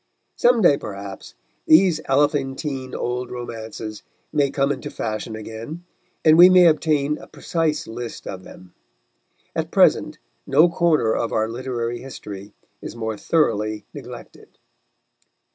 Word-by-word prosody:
Some 240 -2 +3
day, 145 -5 +6
perhaps, 100 -1 -8 0.3
these 160 -1 +5
elephantine 135 -1 0
old 125 0 -3
romances 110 -3 -7 0.3
may 145 -2 +2
come 140 +1 0
into 135 -3 -4
fashion 110 0 -4
again, 115 +10 -8 0.4
and 160 +1 +6
we 180 +1 +10
may 185 -1 +7
obtain 150 -2 +2
a - - -12
precise 165 -3 -2
list 120 +1 -7
of 95 -1 -7
them. 90 -1 -14 0.8
At - - -2
present - - +3 0.3
no 155 +6 +5
corner 160 -10 +2
of 115 - -1
our 110 0 +1
literary 120 0 -4
history 105 -6 -9 0.3
is - - -8
more 110 -1 -3
thoroughly 110 -6 0
neglected. - - -11
130 Hz, 125 wpm, -22 LUFS, 110-155 Hz, 0.8 s, we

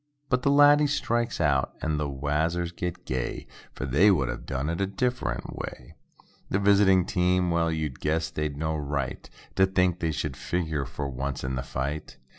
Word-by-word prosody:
But 125 -1 +2
the 140 - +2
laddie 145 +1 +6
strikes 120 -4 -1
out 70 -3 +1
and 80 -1 -1
the 75 -1 -1
wazzers 80 +5 -1
get 90 0 -4
gay, 65 -1 -3 0.3
For - - -4
they 70 +11 +5
"would 70 -11 +2
a' - - -2
done 65 +3 -4
it 85 +3 -2
a 100 - +1
different 125 +6 -2
way." - - -7 0.6
The - - +1
visiting 100 -2 +5
team—well, 90 -2 +1
you'd 80 -5 -3
guess 80 +2 0
they'd 75 -2 -3
no 80 +1 -1
right 70 -3 -3 0.3
To 95 0 +5
think 90 -2 +1
they 80 -2 0
should 75 -2 -3
figure 80 -4 -2
for 70 +2 -4
once 65 0 -4
in 65 0 -2
the 65 - -1
fight. 70 +4 -4
80 Hz, 180 wpm, -27 LUFS, 70-95 Hz, 0.6 s, laddie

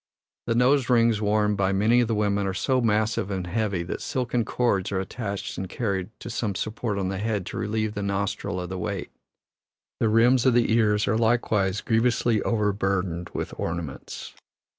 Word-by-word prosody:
The 115 - +1
nose 130 +2 +3
rings 115 -3 +4
worn 105 0 +2
by 95 -1 +1
many 110 +5 +3
of 120 - +1
the 115 - 0
women 100 -1 +1
are 95 - -2
so 130 +4 +1
massive 110 -2 +1
and 95 -2 -3
heavy 100 -1 -1
that 85 - -5
silken 125 -2 -1
cords 110 -5 0
are 95 - 0
attached 100 +1 -4
and 95 -1 -4
carried 100 -6 -2
to - - -6
some 105 -3 -2
support 110 +1 -3
on 95 -1 -1
the 95 -1 -3
head 105 -3 -1
to - - -6
relieve 110 -1 -1
the 105 - -4
nostril 100 -2 -2
of 90 -1 -5
the 95 0 -4
weight. - - -4 0.9
The 110 - +2
rims 120 +3 +4
of 125 - +4
the 120 -2 +3
ears 105 -2 +3
are 110 - +2
likewise 105 -4 +1
grievously 115 -1 +2
overburdened 95 -5 0
with - - -3
ornaments. 85 -5 -5
105 Hz, 185 wpm, -25 LUFS, 95-115 Hz, 0.9 s, rings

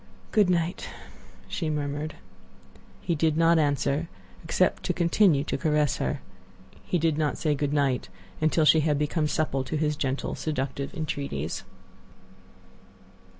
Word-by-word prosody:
"Good 210 -4 +4
night," 175 0 0 0.6
she 165 -4 -2
murmured. 150 0 -3 0.9
He 170 - -1
did 160 0 +1
not 165 0 +5
answer, 145 +2 +1 0.3
except 175 +2 +1
to 180 - +1
continue 170 -3 +3
to - - -3
caress 150 -2 +2
her. 145 - -2 0.6
He 180 - 0
did 160 -2 +1
not 150 -2 0
say 155 -2 +1
good 145 0 -1
night 140 -4 +1 0.3
until 155 0 +3
she 155 +2 +6
had 150 -1 +2
become 150 +1 0
supple 150 -3 0
to 155 - -3
his 150 0 +1
gentle, 135 -2 -2
seductive 140 -2 -3
entreaties. 140 - -3
150 Hz, 135 wpm, -27 LUFS, 145-165 Hz, 0.9 s, she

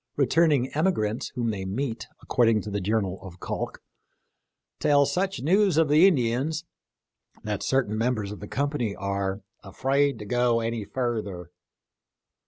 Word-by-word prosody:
Returning 145 -2 +3
emigrants 130 - 0
whom 120 -2 0
they 100 -3 -4
meet, 115 +5 -3 0.2
according 115 -3 +3
to 105 - -7
the 100 0 -2
journal 95 -1 -1
of 90 -2 -11
Calk, - - -5 0.5
" - - -57
tell 145 -1 +4
such 185 +4 -1
News 190 +2 +3
of 160 -2 +4
the 155 +6 +7
Indians 145 +1 0 0.4
" - - -33
that 105 -1 -3
certain 130 -6 +1
mem 125 +2 +1
bers 105 -2 -4
of 105 - -8
the 105 - -8
company 140 -6 -1
are 100 0 -2
" - - -43
afrade 135 +7 +1
to 105 - -8
go 120 +1 +2
aney 115 -2 -2
further." 105 -8 -3
120 Hz, 160 wpm, -26 LUFS, 105-145 Hz, 0.5 s, the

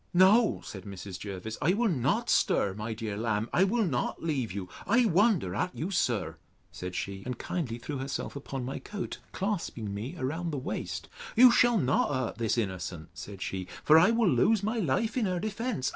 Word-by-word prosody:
No, 200 +5 +5
said 95 - -8
Mrs. 95 -2 -7
Jervis, 100 +2 -6
I 170 +6 +3
will 235 +2 +2
not 175 - +1
stir, 100 - +2
my 110 +2 -4
dear 110 -2 -4
lamb; 110 0 -1
I 185 - +5
will 220 +3 +2
not 130 -3 -2
leave 135 - -1
you. 95 -1 -5 0.2
I 235 +5 +4
wonder 195 - +3
at 180 - -2
you, 175 +6 -3
sir, 120 - 0 0.3
said 90 0 -6
she; 100 -1 -4
and 125 +1 -4
kindly 130 -9 -3
threw 135 +3 -5
herself 135 +2 -4
upon 135 -2 -5
my 135 - -4
coat, 205 -3 -6
clasping 165 - -3
me 110 +7 -5
round 160 +6 -2
the 145 - -3
waist: 135 - -4 0.3
You 245 +2 +9
shall 240 -1 +5
not 140 -4 +2
hurt 130 -4 -2
this 115 0 +1
innocent, 90 -6 -3
said 95 +7 -7
she: 95 -1 -4 0.2
for 155 +1 +7
I 180 - +6
will 230 -2 +3
lose 190 - +3
my 220 +3 0
life 215 - 0
in 225 -5 +2
her 180 -1 -1
defence. 215 - -2
135 Hz, 195 wpm, -29 LUFS, -, 0.3 s, You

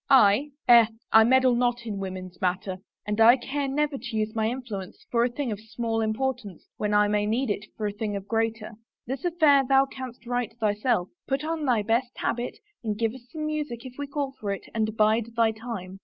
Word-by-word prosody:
" - - -49
I? 260 +1 +5 0.2
Eh, 235 -2 +8 0.2
I 220 - +8
meddle 260 +2 +4
not 240 0 0
in 205 -3 -4
women's 185 -2 -6
matter! 185 +1 -1 0.3
And 210 +1 -1
I 235 +3 +8
care 275 +3 -3
never 290 +1 0
to 235 0 -6
use 215 0 -1
my 220 -1 +1
influence 230 -7 -6
for 235 -1 +3
a 245 - +2
thing 250 0 -3
of 205 - -4
small 225 +1 -2
im 220 0 0
portance 230 -8 -3
when 210 0 -1
I 210 0 +4
may 210 0 +1
need 235 +2 0
it 200 0 -4
for 215 - -2
a 205 - 0
thing 205 0 -3
of 200 0 -6
greater. 225 0 -1 0.3
This 265 +5 -4
affair 310 -5 +5
thou 270 +1 +4
canst 260 -2 -9
right, 245 -2 -2
thyself. 210 -3 +1 0.2
Put 270 +1 -1
on 315 -1 -2
thy 240 -5 +2
best 235 +4 0
habit 240 +1 -2 0.3
and 215 -2 -2
give 225 0 0
us 255 -1 -13
some 310 -1 -4
music 300 -6 -3
if 255 - -8
we 285 - -3
call 280 -1 -2
for 205 - -4
it 195 - -3
and 220 -1 -1
bide 220 +2 +2
thy 230 -1 +3
time. 215 -5 -7
230 Hz, 220 wpm, -26 LUFS, 210-260 Hz, 0.3 s, Eh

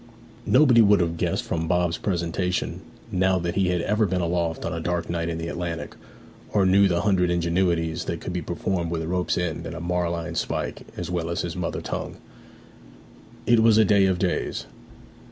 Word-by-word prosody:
Nobody 125 -3 +6
would 105 -1 +5
have 85 -1 0
guessed - - -1
from 80 0 -2
Bob's 90 -1 +1
presentation 90 0 -2 0.3
now 95 0 +2
that 85 -1 -2
he 95 -1 +1
had 90 -1 +1
ever 105 +3 +1
been 95 -1 -1
aloft 85 -1 -1
on 85 - -2
a 85 - -3
dark 85 +1 -2
night 85 -1 -2
in 85 - -3
the 85 0 -4
Atlantic, 85 -1 -4 0.6
or 100 -2 +3
knew 100 +2 +5
the 85 -2 +1
hundred 95 -4 +2
ingenuities 85 -1 0
that 85 - -3
could 90 - -5
be 90 - -2
performed 85 +1 -2
with 80 -1 -2
a - - -5
rope's 90 +1 0
end 90 -3 -2
and 85 - -6
a - - -5
marline 85 -1 -2
spike - - -3
as 90 0 -4
well 85 -2 -2
as 85 - -1
his 85 -1 -4
mother 90 -2 -3
tongue. - - -5 1.3
It 120 -1 +5
was 110 -1 +5
a 110 - +6
day 100 -1 +4
of 95 -1 +1
days. 90 -1 -1
90 Hz, 195 wpm, -24 LUFS, 85-95 Hz, 1.3 s, Nobody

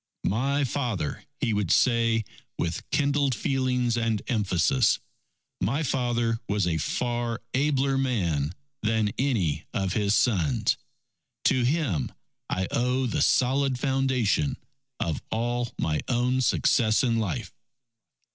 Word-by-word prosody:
"My 140 +7 +1
father," 120 - -2 0.2
he 120 -6 +1
would 105 -4 0
say 115 -3 +3 0.3
with 85 0 -3
kindled 140 -2 +1
feelings 125 -1 0
and 115 -2 0
emphasis, 110 - +2 0.6
"my 130 - 0
father 120 -4 0
was 100 -2 +1
a 80 -2 0
far 120 +6 -1
abler 135 -1 +2
man 90 - 0 0.3
than 110 -1 +1
any 95 - 0
of 95 -2 0
his 105 0 +2
sons. 85 - +2 0.7
To 130 - +3
him 120 - 0 0.4
I 95 0 -1
owe 125 +2 +1
the 120 - -1
solid 130 +1 +2
foundation 130 - +1 0.4
of 80 -2 -2
all 120 +1 -1
my 75 -1 0
own 125 +1 +1
success 110 -1 +3
in 115 -3 +2
life." 105 -2 -3
120 Hz, 120 wpm, -26 LUFS, 100-130 Hz, 0.7 s, say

